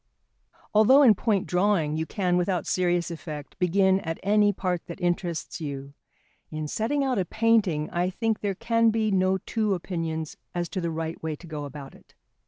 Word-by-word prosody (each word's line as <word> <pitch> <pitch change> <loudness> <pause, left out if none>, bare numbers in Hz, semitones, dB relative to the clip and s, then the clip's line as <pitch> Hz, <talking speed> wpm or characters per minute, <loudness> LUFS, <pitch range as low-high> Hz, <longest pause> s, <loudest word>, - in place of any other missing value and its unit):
Although 255 +7 +6
in 235 -5 +8
point 205 -1 0
drawing 180 -5 +1
you 160 0 -2
can, 180 -3 0
without 180 -2 0
serious 175 -2 0
effect, 155 -3 -8
begin 190 +1 +3
at 165 -3 -5
any 205 +1 +4
part 180 -3 -2
that 170 - -8
interests 175 -2 -2
you, 140 -2 -6 0.6
in 155 -1 -4
setting 240 - 0
out 260 -5 0
a 185 - 0
painting 205 -8 +2
I 180 0 0
think 225 +3 -1
there 200 -2 -2
can 230 +3 +2
be 220 -1 +1
no 190 0 +2
two 215 +1 -1
opinions 165 -3 -4 0.2
as 175 -1 -2
to 185 - -3
the 170 - -1
right 160 0 -4
way 160 -1 -3
to 175 - -14
go 150 -3 -5
about 140 -1 -9
it. - - -20
180 Hz, 185 wpm, -26 LUFS, 160-205 Hz, 0.6 s, in